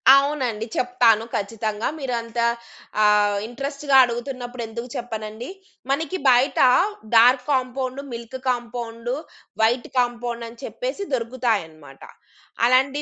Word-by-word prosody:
అవునండి 270 -6 0
చెప్తాను. 240 -3 +3
ఖచ్చితంగా 215 +1 -2
మీరు 265 -3 -3
అంత 230 +1 -6 0.6
ఆహ్, 210 -1 +4
ఇంట్రెస్ట్‌గా 280 +3 -2
అడుగుతున్నప్పుడు 245 0 -5
ఎందుకు 235 +2 -6
చెప్పనండి? 220 0 -6 0.4
మనకి 320 +6 -1
బయట 250 +2 +3 0.6
dark 250 +3 +6
compound, 260 0 -1
milk 235 +2 -7
compound, 240 0 -3 0.5
white 240 +2 +2
compound 240 -1 -2
అని 230 0 -15
చెప్పేసి - - -4
దొరుకుతాయన్నమాట. 215 - -2 0.7
అలాంటి 265 +3 +3
240 Hz, 100 wpm, -23 LUFS, 225-260 Hz, 0.7 s, dark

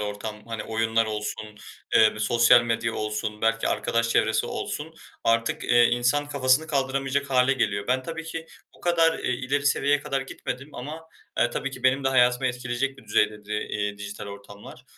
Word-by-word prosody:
ortam. 105 +1 -5
Hani, 115 -2 -4
oyunlar 115 0 +1
olsun, 105 0 -4 0.5
eee, 110 - +7
bir 110 - -9
sosyal 120 +2 +5
medya 115 -1 -1
olsun, 105 0 -3
belki 115 0 +2
arkadaş 115 0 0
çevresi 110 -1 +2
olsun; - - -5 0.3
artık, 115 0 +1
eee, 120 0 +5
insan 125 +5 +1
kafasını 140 +1 +2
kaldıramayacak 135 -1 -1
hâle 125 +1 +4
geliyor. 100 -6 -1
Ben 130 +1 +1
tabii 165 +3 -6
ki 165 0 -6 0.3
bu - - -20
kadar, 165 -2 +3
eee, - - -2
ileri 135 +3 -1
seviyeye 145 +1 +2
kadar 140 -2 -2
gitmedim 135 +1 -7
ama, 155 +6 -7 0.3
e, 120 - +2
tabii 140 +3 -3
ki - - -10
benim 130 +1 +3
de - - +4
hayatımı 125 0 +3
etkileyecek 125 +2 -2
bir 135 - -15
düzeydeydi, 105 0 0
eee, 105 -1 -2
dijital 100 0 -7
ortamlar. 100 +4 -11
125 Hz, 170 wpm, -25 LUFS, 110-135 Hz, 0.5 s, eee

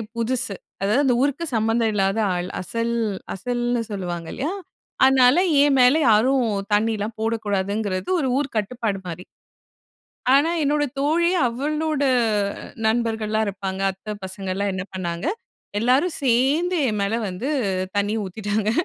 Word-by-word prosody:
புதுசு. 235 -2 0 0.3
அதாவது 215 +9 +2
அந்த 250 - +4
ஊருக்கு 285 +4 0
சம்மந்தம் 225 0 +1
இல்லாத 195 +1 +1
ஆள். 180 0 -3
"அசல் 230 +4 -2 0.4
அசல்"ன்னு 240 +3 -1
சொல்லுவாங்க 175 -4 -4
இல்லயா? 285 +6 -2 0.5
அதனால 260 0 +5 0.3
என் 285 -2 +3
மேல 250 +4 +6
யாரும் 250 +5 +4 0.3
தண்ணியலாம் 215 0 0
போடக்கூடாதுங்கிறது 205 -3 -1
ஒரு 270 - 0
ஊர் 285 -1 -2
கட்டுப்பாடு 215 -1 -2
மாரி. 175 +1 -7 1.1
ஆனா 295 +4 +4
என்னோட 295 +1 +2
தோழி 330 +5 +2 0.2
அவளோட 300 +4 -1 0.8
நண்பர்கள்லாம் 220 -1 0
இருப்பாங்க 195 -1 -4
அத்த 210 +3 -7
பசங்கலாம் 190 +1 -3
என்ன 185 0 -3
பண்ணாங்க, 175 +1 -3 0.5
எல்லாரும் 260 +10 +2
சேர்ந்து 275 +8 +2
என் 210 -1 -1
மேல 210 +3 0
வந்து 190 +9 -4 0.5
தண்ணி 205 +1 +1
ஊத்திட்டாங்க. 205 +2 -2
225 Hz, 120 wpm, -23 LUFS, 200-265 Hz, 1.1 s, மேல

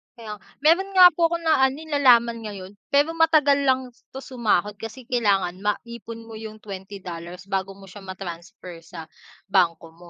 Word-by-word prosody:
Kaya 215 -3 -9
ng - - -35 0.2
meron 380 +5 +3
nga 360 -1 +9
po 335 0 +2
akong 335 0 -4
na 320 -4 +3
ano, 265 - -5
eh, 315 +2 -11
nalaman 240 -5 +4
ngayon. 195 -2 -8 0.2
Pero 290 +3 +2
matagal 310 -4 +3
lang 260 -1 +1 0.2
'to 265 - -7
sumahod, 210 -5 -1
kasi 225 +5 -8
kailangan 200 -7 0
maipon 230 +2 -5
mo 225 -1 -10
yung 220 -1 -8
$20 185 -3 -8
bago 195 0 -2
mo 195 - -16
siya 195 +2 -12
ma-transfer 180 -2 -9
sa 165 -1 -11 0.4
bangko 170 -4 +1
mo. 170 +1 -16
215 Hz, 170 wpm, -23 LUFS, 185-265 Hz, 0.4 s, nga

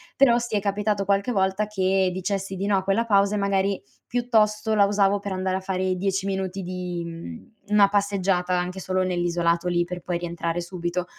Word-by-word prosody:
però 240 -3 +5
sì, 235 -2 -3
è - - +3
capitato 200 0 -1
qualche 200 +5 +1
volta 190 0 +1
che 190 -2 +1
dicessi 195 +1 -3
di 195 - -3
no 200 -1 +2
a 190 - -1
quella 200 +4 +1
pausa 200 -1 +3
e - - 0
magari 200 0 +1 0.3
piuttosto 220 -3 +1
la 200 -2 +5
usavo 200 0 +2
per 200 -1 -4
andare 185 0 -1
a - - -3
fare 185 -1 -1
10 195 +1 -1
minuti 190 0 -2
di, 180 -1 -4
mhmm, 165 - -9 0.2
una 205 -1 +5
passeggiata 195 -3 +1
anche 180 +1 -3
solo 185 0 0
nell'isolato 175 -1 0
lì 175 -1 +2
per 180 +1 -6
poi 175 -1 -2
rientrare 170 0 -3
subito; 175 0 -3
190 Hz, 195 wpm, -24 LUFS, 180-200 Hz, 0.3 s, però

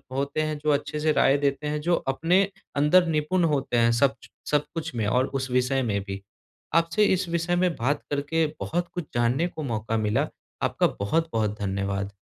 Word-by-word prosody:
होते 140 +3 -1
हैं 155 -1 -2
जो 150 +1 -2
अच्छे 145 +1 -1
से 155 0 +2
राय 140 -1 +4
देते 140 +1 -1
हैं, 150 0 -2
जो 170 +2 +2 0.2
अपने 170 +7 +3 0.3
अंदर 165 +5 +4
निपुण 165 +3 +1
होते 135 -3 0
हैं, 115 0 +4
सब 135 +3 +2
ज - - -13 0.2
सब 150 0 +2
कुछ 165 -2 -4
में 110 - -1
और 125 +4 +2
उस 135 -2 -3
विषय 125 +1 +2
में 100 -3 0
भी। 100 0 -5 0.5
आपसे 165 +4 +3
इस 185 -1 -1
विषय 170 +1 0
में 175 -1 +1
बात 145 +5 0
करके 150 +3 +1
बहुत 175 +1 -2
कुछ 175 -3 -4
जानने 120 +8 +1
को 160 - -7
मौका 115 -3 -2
मिला। 105 -1 +1 0.4
आपका - - +2
बहुत-बहुत 110 -3 0
धन्यवाद। 100 0 -2
145 Hz, 190 wpm, -26 LUFS, 120-165 Hz, 0.5 s, राय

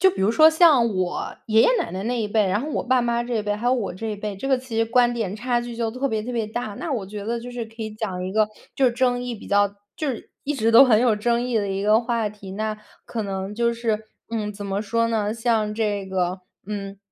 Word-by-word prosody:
就 380 +1 +6
比 190 - -3
如 200 - +4
说 315 +5 +8
像 315 -8 +5
我 180 -1 -2
爷 220 -1 +4
爷 - - +6
奶 - - -2
奶 185 +2 -4
那 240 0 -1
一 210 - -1
辈， 210 -1 +2
然 190 +2 +1
后 305 - -4
我 - - -1
爸 255 0 +2
妈 235 0 0
这 240 0 -2
一 215 - 0
辈， 205 0 -1
还 220 +4 -4
有 255 - +4
我 205 -7 -2
这 225 +5 -6
一 - - -5
辈， 205 0 -4
这 270 +8 -5
个 265 - +4
其 250 -2 -8
实 225 - +2
观 240 +1 +3
点 215 -4 -3
差 240 +1 0
距 240 -1 -7
就 230 -1 -1
特 255 +4 -2
别 220 -3 -1
特 245 +3 -5
别 230 -3 -1
大。 225 +1 -4
那 335 - -4
我 230 -8 -1
觉 205 +1 -7
得 235 +1 -1
就 240 +1 -8
是 240 -2 -5
可 225 0 -9
以 215 - -4
讲 200 -4 -4
一 185 - -4
个 215 0 +3 0.3
就 270 - +3
是 245 - +3
争 245 -1 +1
议 245 -1 -4
比 215 - -11
较 205 0 +3 0.3
就 305 - -3
是 255 - -5
一 295 +1 -1
直 230 -3 +1
都 235 +4 +10
很 220 -4 +5
有 240 -3 +4
争 235 +3 +1
议 245 -2 0
的 200 -2 -1
一 195 +1 -2
个 215 +2 +4
话 230 -3 -1
题。 200 -2 -11
那 215 +1 -3 0.3
可 230 - -4
能 195 0 -4
就 235 +1 +1
是， 220 -2 -1 0.3
嗯， 215 -2 -2
怎 205 0 -8
么 200 0 -2
说 230 +2 +1
呢， 215 -1 0
像 225 -2 0
这 205 -3 -1
个， 185 -1 -1 0.3
嗯， 200 -1 -5
225 Hz, 300 characters per minute, -23 LUFS, 205-240 Hz, 0.3 s, 都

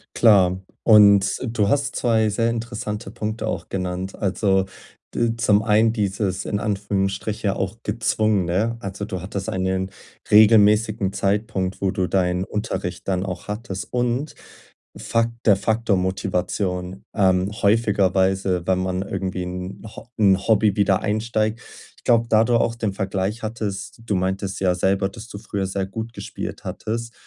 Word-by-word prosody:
Klar. 95 -5 +4 0.2
Und 100 -3 +6
du 110 -4 0
hast 140 +2 0
2 110 -2 +2
sehr 115 +3 +1
interessante 115 -2 -4
Punkte 110 +1 -4
auch - - -4
genannt. 90 0 -3
Also, 95 -1 +1 0.5
d 115 -1 0
zum 105 -2 +3
einen 110 +1 +3
dieses 100 -3 -1
in 100 - -1
Anführungsstriche 100 0 -1
auch 95 +3 -3
gezwungen, 110 -2 +1
ne? 105 +7 0
Also, 100 0 -5
du 95 -4 -5
hattest 95 +1 -5
einen 95 0 -1 0.4
regelmäßigen 105 -1 +5
Zeitpunkt, 100 -2 -1
wo 95 -1 +1
du 95 -1 -1
deinen 90 -1 +1
Unterricht 95 -4 -4
dann 95 -1 0
auch 95 +1 -6
hattest 105 -2 -5
und 125 +4 -1 0.6
Fakt 115 0 0
der 105 -3 +6
Faktor 110 +1 +1
Motivation. 90 0 -2
Ähm, 95 -1 +2
häufigerweise, 95 -4 +2
wenn 95 -1 +2
man 95 0 -1
irgendwie 95 -3 -3
'n 90 +1 -6
Ho - - -11
in 100 -3 +5
Hobby 105 0 +2
wieder 100 -2 +3
einsteigt 110 +1 -1 0.4
Ich - - -23
glaube, 115 -1 +3
da 110 0 +5
du 120 +1 +1
auch 115 0 +1
den 110 -4 -2
Vergleich 95 +2 -2
hattest 105 -1 -5
Du 105 - 0
meintest 95 +1 -2
ja 90 -2 +2
selber, 95 +2 +1
dass 115 +2 -11
du 100 - -8
früher 100 -2 -3
sehr 95 0 -2
gut 110 +4 -6
gespielt - - -7
hattest 115 +1 -4
100 Hz, 150 wpm, -22 LUFS, 95-110 Hz, 0.6 s, Und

